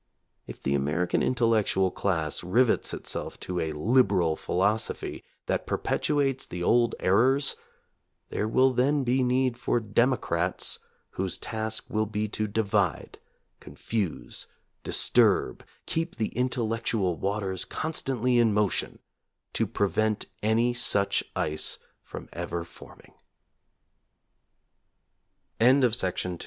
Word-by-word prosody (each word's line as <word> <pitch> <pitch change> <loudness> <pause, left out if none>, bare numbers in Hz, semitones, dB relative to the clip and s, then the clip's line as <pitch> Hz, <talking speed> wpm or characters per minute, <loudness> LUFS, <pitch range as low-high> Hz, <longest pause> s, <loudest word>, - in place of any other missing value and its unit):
If - - -10
the 70 - 0
American 75 +6 0
intellectual 110 -6 +2
class 80 -7 -1
rivets 115 +7 +2
itself - - -5
to 90 -1 -3
a 80 -2 -1
"liberal" 95 -2 +2
philosophy 100 +7 -1 0.2
that - - -2
perpetuates 140 -3 0
the 90 0 -5
old 120 +4 +3
errors, 130 +9 +3 0.7
there 105 - -1
will 130 +3 +3
then 140 +3 +2
be 130 +1 +1
need 125 -1 +1
for 120 - +1
"democrats" 105 -6 +1 0.3
whose 95 -2 -3
task 110 0 -4
will 110 0 -1
be 105 0 -2
to 110 0 -2
divide, 100 -3 -1 0.4
con - - -13
fuse, 100 - -3 0.4
disturb, 65 - +2 0.2
keep 165 +1 -2
the 110 -2 -1
intellectual 115 -6 -1
waters 95 -1 -2
con 160 +1 -4
stantly 125 -4 +1
in 115 -3 +3
motion 105 -2 0 0.6
to - - 0
prevent 110 +1 0 0.2
any 115 +3 +2
such 100 -4 +2
ice 75 0 0 0.2
from - - -9
ever 85 0 -4
fo - - -14
110 Hz, 110 wpm, -27 LUFS, 95-125 Hz, 0.7 s, old